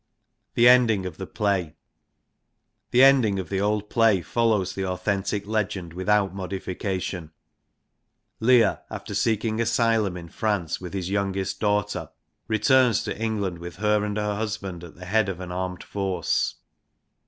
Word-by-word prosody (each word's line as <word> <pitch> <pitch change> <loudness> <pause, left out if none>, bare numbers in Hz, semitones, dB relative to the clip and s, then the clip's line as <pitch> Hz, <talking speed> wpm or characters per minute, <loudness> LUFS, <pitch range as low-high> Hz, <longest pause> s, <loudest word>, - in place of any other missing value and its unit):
The 120 - +6
ending 120 -6 +5
of 90 -3 -6
the 95 - -6
play. 95 -7 -1 1.1
The 125 +2 +5
ending 130 -7 +5
of 95 -3 -4
the 95 -1 -1
old 105 0 0
play 110 -5 +3
follows 110 -4 +1
the 95 - -3
authentic 95 +2 -2
legend 100 -5 -2
without 95 +1 +1
modification. 95 -2 -4 1.1
Leir, 115 -2 +4
after - - -7
seeking 110 0 0
asylum 115 -4 +1
in 85 -1 -9
France 100 -5 -2
with 90 +1 -7
his 95 -1 -3
youngest 100 -1 -1
daughter, 105 -1 0 0.4
returns 125 +2 +3
to - - -3
England 105 -6 -2
with 85 0 -8
her 105 +1 +1
and 105 0 -2
her 105 -1 0
husband 100 -5 -4
at 85 - -11
the 90 - -10
head 105 +2 +2
of 90 -2 -5
an 90 -1 -6
armed 90 0 -4
force. 95 -5 -1
100 Hz, 145 wpm, -25 LUFS, 95-110 Hz, 1.1 s, The